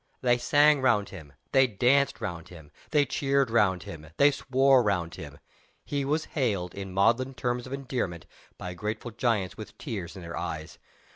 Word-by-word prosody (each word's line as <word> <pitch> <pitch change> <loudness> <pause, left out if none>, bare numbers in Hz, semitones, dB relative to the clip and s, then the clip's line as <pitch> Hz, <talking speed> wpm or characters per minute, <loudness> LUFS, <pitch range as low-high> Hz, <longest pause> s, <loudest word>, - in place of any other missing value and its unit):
They 120 -1 +3
sang 145 +4 +4
round 115 -6 +2
him, 80 -7 -11 0.2
they 135 -1 +5
danced 125 +6 +2
round 90 -2 -5
him, 80 -5 -13 0.2
they 150 -2 +3
cheered 135 -3 0
round 95 -6 +2
him, 80 -1 -9
they 145 +1 +6
swore 135 -1 +3
round 90 -6 -1
him. 75 -5 -9 0.5
He 140 -1 -2
was 150 +3 0
hailed, 100 - -1
in 95 -1 -7
maudlin 115 +7 +2
terms 125 0 -2
of 130 - -7
endearment, 125 - -3 0.3
by 90 -1 -6
grateful 110 +6 -5
giants 110 -5 -1
with 110 - -10
tears 105 - -6
in 95 - -9
their 85 0 -7
eyes. 80 -2 -5
115 Hz, 170 wpm, -27 LUFS, 90-135 Hz, 0.5 s, they